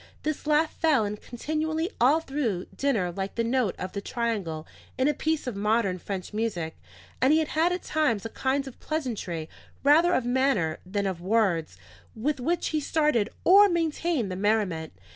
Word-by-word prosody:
This 305 0 -3
laugh 305 +1 +3
fell 300 -9 +2
in 205 +1 -3
continually 315 - -2
all 285 +7 +5
through 250 - -2
dinner 225 -11 0
like 195 +2 -4
the 230 - 0
note 235 -4 +1
of 185 - -5
the 200 - -4
triangle 200 -10 -2 0.3
in 260 - +2
a 300 - +3
piece 315 +2 -1
of 250 -5 -3
modern 205 -2 +1
French 190 +1 -5
music; 195 -8 -2 0.5
and 260 +3 +5
he 310 - +5
had 320 +3 +1
at 360 0 -3
times 265 -10 0
a - - -3
kind 270 +4 -1
of 265 - -10
pleasantry, 220 - -3 0.4
rather 325 +5 +5
of 255 - 0
manner 245 - +1
than 200 +1 -1
of 185 -3 -3
words, 185 -5 +1 0.4
with 270 +6 -1
which 335 +8 0
he 310 - 0
started 300 -7 +1
or 405 +3 +7
maintained 330 - 0
the - - -3
merriment. 195 -5 0
240 Hz, 175 wpm, -27 LUFS, 200-305 Hz, 0.5 s, or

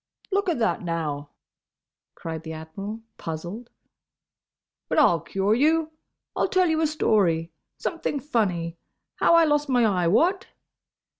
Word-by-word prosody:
"Look 395 -1 +1
a 340 - +1
that, 230 -1 0
now!" 155 -5 -3 0.9
cried 160 -1 -6
the 160 0 -7
Admiral, 195 +8 -7 0.2
puzzled. 175 +9 -6 1.2
"But - - -1
I'll 175 - +5
cure 195 +6 0
you! 310 +5 +2 0.4
I'll - - +1
tell 370 -1 +3
you 320 0 +1
a 315 - +3
story. 180 - +1 0.3
Something 330 -4 -2
funny. 180 - -1 0.4
How 335 - +4
I 335 -1 +6
lost 295 -1 +1
my 245 -3 +4
eye—what?" 215 - +2
215 Hz, 130 wpm, -25 LUFS, -, 1.2 s, I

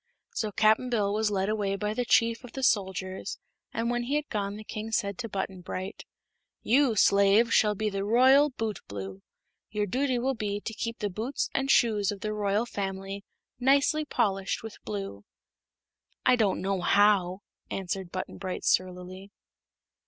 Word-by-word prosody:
So 215 -2 -2
Cap'n 220 +5 +3
Bill 205 -4 +1
was 215 0 +1
led 195 -1 0
away 205 -2 0
by 210 +1 -2
the 245 +2 -1
chief 230 +1 +3
of 245 - -11
the 265 - -5
soldiers, 190 -4 0 0.3
and 230 +1 -1
when 240 0 -1
he 275 +4 -1
had 300 0 -1
gone 200 -2 -2
the 215 - -8
king 215 +1 -6
said 200 -3 -1
to 230 -2 -4
Button 190 -2 -4
Bright: 185 +1 -6 0.6
"You, 255 0 +3
slave, 200 +3 +4
shall 210 -1 +4
be 215 +2 -1
the 195 -1 -2
Royal 260 +7 +5
Bootblue. 100 - -5 0.5
Your 210 -1 -1
duty 255 +5 0
will 260 +3 0
be 205 -4 -3
to 225 - -6
keep 230 +1 -4
the 205 -1 -2
boots 230 +9 -3
and 270 0 0
shoes 215 -6 +3
of 200 -2 -7
the 215 0 -2
royal 210 +1 0
family 195 -2 -4 0.4
nicely 280 +4 +3
polished 195 -10 -1
with 225 - -9
blue." 100 -1 -5 1.0
"I 255 - +6
don't 215 -5 +1
know 195 0 0
how," 200 -1 +3 0.3
answered 190 -1 -4
Button 185 -1 -5
Bright, 185 -1 -4
surlily. 185 +1 -1
210 Hz, 165 wpm, -28 LUFS, 195-230 Hz, 1.0 s, I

